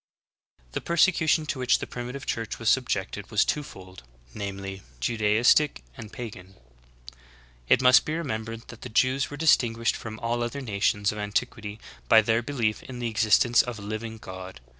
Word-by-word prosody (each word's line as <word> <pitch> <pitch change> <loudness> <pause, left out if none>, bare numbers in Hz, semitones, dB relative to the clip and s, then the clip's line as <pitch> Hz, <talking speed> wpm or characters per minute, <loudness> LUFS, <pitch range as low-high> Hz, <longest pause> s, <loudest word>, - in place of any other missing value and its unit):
7. - - -33
The - - -3
persecution 165 -2 +3
to 140 - -3
which 125 -1 +3
the - - -5
Primitive 125 +3 -7
Ciiurch 115 -2 -3
was 115 -1 +2
subjected 105 -6 -1
was 110 -1 +3
two 150 - 0
fold; 95 - -12 0.3
viz. 95 -1 -6 0.2
Judaistic 110 - +3
and 110 - -10
pagan. 95 -5 -9 1.1
It - - +5
must 125 0 +7
be 155 - -3
remembered 115 -7 -5
that 115 - -11
the 125 - -7
Jews 130 +4 +2
were 145 - -7
distinguished 120 -7 +3
from 110 -1 -7
all 120 +1 -1
other 120 +4 -3
nations 105 -3 0
of 105 - -7
antiquity 105 +1 -3 0.3
by 110 - +7
their 115 +1 +2
belief 120 -5 -1
in 130 -2 -9
the 120 -1 -2
existence 110 +2 +4
of 120 -2 -6
a 100 - -9
living 110 +2 -5
God. 95 - -9
115 Hz, 170 wpm, -26 LUFS, 105-125 Hz, 1.1 s, must